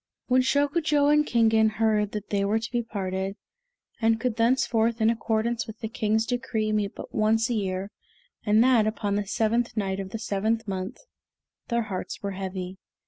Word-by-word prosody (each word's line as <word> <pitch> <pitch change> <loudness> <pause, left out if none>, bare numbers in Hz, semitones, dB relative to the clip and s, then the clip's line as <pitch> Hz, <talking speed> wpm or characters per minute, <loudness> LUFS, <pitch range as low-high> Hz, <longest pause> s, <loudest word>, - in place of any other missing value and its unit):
When 255 0 +3
Shokujo 290 +2 +2
and 300 0 +5
Kingen 225 -2 +4
heard 215 -2 +2
that 210 -1 -6
they 200 -1 +1
were 205 +2 +2
to 225 0 -4
be 240 -1 0
parted, 195 -3 -3 0.7
and 225 0 +3
could 245 -1 -1
thenceforth, 230 -1 +2
in 220 +1 +4
accordance 230 +1 -1
with 220 - -8
the 220 - -4
King's 220 -1 0
decree, 240 -3 -1
meet 210 -2 -1
but - - -9
once 225 +2 +2
a - - +2
year, 195 -2 -2 0.5
and 215 +1 +4
that 245 -4 +4
upon 215 -2 -1
the 205 -1 -1
seventh 230 +3 0
night 195 -2 -1
of 195 -1 -5
the 225 - -4
seventh 220 +2 -1
month, 190 -1 -4 0.7
their 235 -1 0
hearts 195 -2 -5
were 200 - -2
heavy. 190 -1 -5
220 Hz, 180 wpm, -26 LUFS, 200-235 Hz, 0.7 s, and